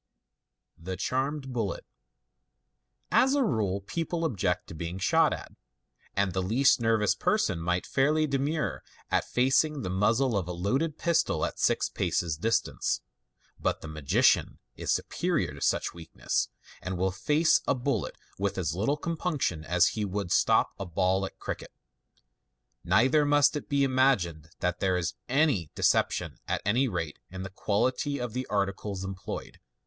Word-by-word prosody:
The 90 Hz, +2 st, -5 dB
Charmed 135 Hz, +1 st, -2 dB
Bullet. 110 Hz, -5 st, -2 dB, 0.7 s
— -, -, -49 dB
As 265 Hz, +2 st, +2 dB
a 280 Hz, -, +3 dB
rule, 100 Hz, -, 0 dB
people 165 Hz, -, -2 dB
object 95 Hz, -, 0 dB
to -, -, -7 dB
being 85 Hz, +3 st, -5 dB
shot 160 Hz, -, +3 dB
at, -, -, -6 dB, 0.6 s
and 100 Hz, -1 st, +1 dB
the 95 Hz, -, 0 dB
least 120 Hz, +7 st, +3 dB
nervous 110 Hz, -3 st, +3 dB
person 105 Hz, -, +1 dB
might 90 Hz, +2 st, -1 dB
fairly 150 Hz, +3 st, +2 dB
demur 145 Hz, +2 st, -1 dB, 0.3 s
at -, -, +2 dB
facing 135 Hz, +3 st, +2 dB
the 90 Hz, -, -3 dB
muzzle 110 Hz, +6 st, +2 dB
of 95 Hz, -4 st, -1 dB
a 90 Hz, -, -3 dB
loaded 135 Hz, -, -1 dB
pistol 170 Hz, -1 st, +1 dB
at -, -, -5 dB
six -, -, +2 dB
paces' 85 Hz, -3 st, -1 dB
distance; 100 Hz, -, 0 dB, 0.6 s
but -, -, -1 dB
the -, -, -7 dB
magician 75 Hz, -3 st, +2 dB, 0.2 s
is -, -, -2 dB
superior -, -, 0 dB
to -, -, -11 dB
such -, -, +1 dB
weakness, 85 Hz, -1 st, -2 dB, 0.3 s
and 95 Hz, -1 st, -4 dB
will 95 Hz, +1 st, +1 dB
face 150 Hz, -, +3 dB
a -, -, +3 dB
bullet 125 Hz, -5 st, -2 dB, 0.2 s
with 100 Hz, 0 st, -1 dB
as 80 Hz, -5 st, -1 dB
little 115 Hz, +11 st, 0 dB
com 165 Hz, +3 st, -3 dB
punction 145 Hz, -, -1 dB
as 90 Hz, +4 st, +3 dB
he 110 Hz, 0 st, -3 dB
would 100 Hz, -2 st, -3 dB
stop -, -, +3 dB
a 100 Hz, -, -3 dB
ball 95 Hz, +2 st, +1 dB
at -, -, -14 dB
cricket. -, -, -6 dB, 1.1 s
Neither 115 Hz, -, +4 dB
must 145 Hz, +1 st, +4 dB
it 150 Hz, -, -5 dB
be 140 Hz, -1 st, +2 dB
imagined 120 Hz, -, +2 dB
that 90 Hz, 0 st, 0 dB
there 95 Hz, -1 st, +1 dB
is 85 Hz, -1 st, -2 dB, 0.2 s
any 130 Hz, -, +2 dB
" -, -, -51 dB
deception," -, -, +1 dB
at -, -, -2 dB
anv 120 Hz, +5 st, +2 dB
rate 85 Hz, -5 st, -4 dB
in 95 Hz, +1 st, -6 dB
the 95 Hz, -, -7 dB
quality 125 Hz, +9 st, 0 dB
of 125 Hz, -3 st, -4 dB
the 130 Hz, 0 st, -3 dB
articles 100 Hz, -1 st, -2 dB
employed. 95 Hz, -1 st, -6 dB
105 Hz, 160 wpm, -28 LUFS, 90-135 Hz, 1.1 s, Neither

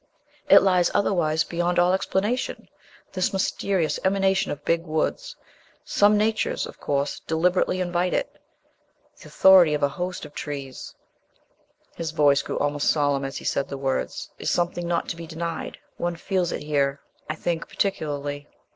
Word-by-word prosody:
It -, -, +8 dB
lies 180 Hz, -3 st, +3 dB
otherwise 160 Hz, -5 st, +2 dB
beyond 175 Hz, +1 st, -1 dB
all 175 Hz, +1 st, +4 dB
explanation, 205 Hz, +5 st, -1 dB, 0.5 s
this 185 Hz, -1 st, 0 dB
mysterious 190 Hz, -3 st, 0 dB
emanation 195 Hz, 0 st, +2 dB
of 145 Hz, -, -7 dB
big 165 Hz, 0 st, +2 dB
woods. 335 Hz, -, -2 dB, 0.5 s
Some 205 Hz, +1 st, +4 dB
natures, 220 Hz, +1 st, 0 dB
of -, -, -11 dB
course, 140 Hz, 0 st, -1 dB
deliberately 180 Hz, +3 st, +1 dB
invite 180 Hz, 0 st, 0 dB
it. -, -, -3 dB, 0.8 s
The -, -, -12 dB
authority 180 Hz, -5 st, +6 dB
of 145 Hz, -, -3 dB
a 140 Hz, -, +4 dB
host 180 Hz, +4 st, -5 dB
of -, -, -13 dB
trees," 140 Hz, -4 st, -7 dB, 1.0 s
his 165 Hz, -1 st, -3 dB
voice 145 Hz, -3 st, +4 dB
grew -, -, -4 dB
almost 145 Hz, 0 st, 0 dB
solemn 145 Hz, -2 st, +1 dB
as 135 Hz, 0 st, -4 dB
he -, -, -9 dB
said 140 Hz, -, 0 dB
the 140 Hz, -, -6 dB
words 135 Hz, -1 st, -3 dB
"is -, -, -2 dB
something 175 Hz, 0 st, -1 dB
not 170 Hz, 0 st, -1 dB
to -, -, -3 dB
be 165 Hz, 0 st, -9 dB
denied. 165 Hz, 0 st, -5 dB, 0.2 s
One 175 Hz, 0 st, -2 dB
feels 180 Hz, 0 st, -1 dB
it -, -, -4 dB
here, 140 Hz, -2 st, 0 dB, 0.3 s
I 155 Hz, -, -2 dB
think, 165 Hz, 0 st, -3 dB
particularly." 145 Hz, -6 st, -2 dB
170 Hz, 155 wpm, -24 LUFS, 145-185 Hz, 1.0 s, It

